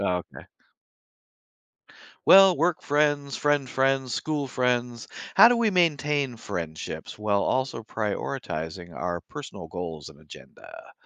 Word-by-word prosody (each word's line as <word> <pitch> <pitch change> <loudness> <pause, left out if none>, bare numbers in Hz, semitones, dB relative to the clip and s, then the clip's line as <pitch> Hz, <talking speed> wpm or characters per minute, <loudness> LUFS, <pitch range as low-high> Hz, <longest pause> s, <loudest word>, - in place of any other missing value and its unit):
Oh, 90 -3 0
okay. - - -11 1.8
Well, 190 -1 +8
work 170 +1 0
friends, 145 -1 +1
friend 145 -2 +1
friends, 135 -1 0
school 150 +2 -2
friends, 125 -2 -1 0.3
how - - +9
do 245 0 +3
we 230 -2 +2
maintain 150 -7 +1
friendships 80 -7 -6
while 105 -1 0
also 130 -2 -1
prioritizing 95 - -5
our 85 0 -4
personal - - -9
goals 80 -4 -7
and 75 - -14
agenda? 75 - -14
130 Hz, 120 wpm, -25 LUFS, 90-145 Hz, 1.8 s, how